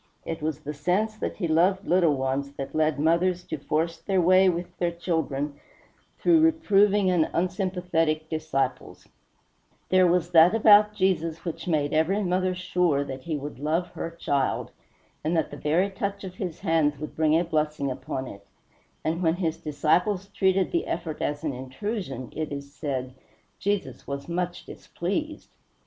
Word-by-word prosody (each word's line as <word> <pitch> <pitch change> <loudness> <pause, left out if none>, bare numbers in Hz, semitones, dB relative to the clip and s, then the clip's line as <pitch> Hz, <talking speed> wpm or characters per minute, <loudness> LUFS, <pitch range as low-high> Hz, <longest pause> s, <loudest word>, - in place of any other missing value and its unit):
It 165 -1 -4
was 155 -1 -2
the 150 0 -5
sense 185 +9 0
that - - -4
he 175 - -1
loved 185 +5 +2
little 170 -4 +3
ones 135 +1 -2
that 135 -1 -6
led 155 -1 +1
mothers 170 +3 +2
to 155 - -5
force 165 +4 -1
their 195 -2 0
way 185 +2 +5
with 175 0 -3
their 175 -1 0
infants 145 -4 -1 0.6
through 335 -2 +4
reproving 210 - +4
and 170 -3 +2
unsympathetic 180 -3 0
disciples; 155 -4 -3 0.8
there 185 -1 +5
was 175 0 +1
that 170 +4 +7
about 210 -1 +6
Jesus 165 -4 0
which 170 0 -5
made 150 -4 +1
every 175 +7 +2
mother 185 0 0
sure 180 -5 +1
that 135 -2 -7
he 155 +1 -3
would 145 -3 -7
love 160 +5 0
her 165 - -5
child, 140 -5 -1 0.5
and 160 +3 0
that 160 - 0
the - - -6
very 175 +6 +1
touch 200 +1 -4
of 185 -2 -6
his 185 -3 -5
hands 160 -5 +2
would 155 +2 -7
bring 155 0 +3
a - - +1
blessing 150 -4 -1
upon 130 0 -4
it; 100 -4 -11 0.6
and 165 +2 -1
when 165 -1 +2
his 170 -3 -1
disciples 180 +6 0
treated 190 -1 +1
the 340 - 0
effort 155 -3 -4
as 145 +1 -2
an 150 -3 -1
intrusion 135 - -5
it 155 -1 -3
is 140 0 -7
said 130 -4 -4 0.5
"Jesus 205 0 -2
was 140 0 -5
much 175 +1 -3
displeased." 300 - -5
165 Hz, 165 wpm, -26 LUFS, 150-185 Hz, 0.8 s, that